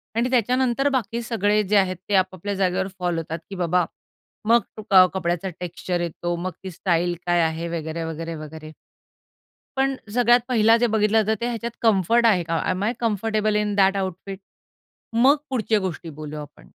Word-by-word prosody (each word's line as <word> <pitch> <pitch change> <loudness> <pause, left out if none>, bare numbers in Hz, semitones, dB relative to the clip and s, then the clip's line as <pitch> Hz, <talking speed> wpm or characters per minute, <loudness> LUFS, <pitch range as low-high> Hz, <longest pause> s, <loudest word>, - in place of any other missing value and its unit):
आणि 240 +2 +1
त्याच्यानंतर 255 +3 +2
बाकी 235 -3 -1
सगळे 210 -2 +1
जे 205 +2 +2
आहेत 185 -2 +2
ते 200 - +2
आपापल्या 185 +1 0
जागेवर 190 0 0
फॉल 175 -2 -1
होतात 165 0 -4
की 195 - -6
बाबा, 180 -1 +1 0.6
मग 235 0 +5 0.5
कपड्याचा 180 0 -1
टेक्स्चर 175 0 -3
येतो 175 +1 -3
मग 180 +2 -4
ती 190 - -6
स्टाईल 175 0 0
काय 175 -1 +3
आहे? 165 +1 -1
वगैरे, 160 +1 -4
वगैरे, 165 +1 -5
वगैरे. 155 0 -9 1.1
पण 270 0 +2 0.2
सगळ्यात 240 0 +5
पहिला 225 -1 +5
जे 240 0 +2
बघितलं 215 +1 +3
जातं 220 +1 0
ते 235 - 0
ह्याच्यात 235 0 -3
कम्फर्ट 225 +2 +3
आहे 195 -6 +4
का? 165 0 -1
M 185 +2 -1
I 230 +4 +1
comfortable 215 -1 0
in 210 -1 0
दयाट 195 0 +4
outfit? 190 +1 -4 0.7
मग 260 +6 +5
पुढच्या 225 -4 +1
गोष्टी 180 -3 -5
बोलूया 150 0 -6
आपण. 145 0 -13
195 Hz, 170 wpm, -23 LUFS, 175-225 Hz, 1.1 s, मग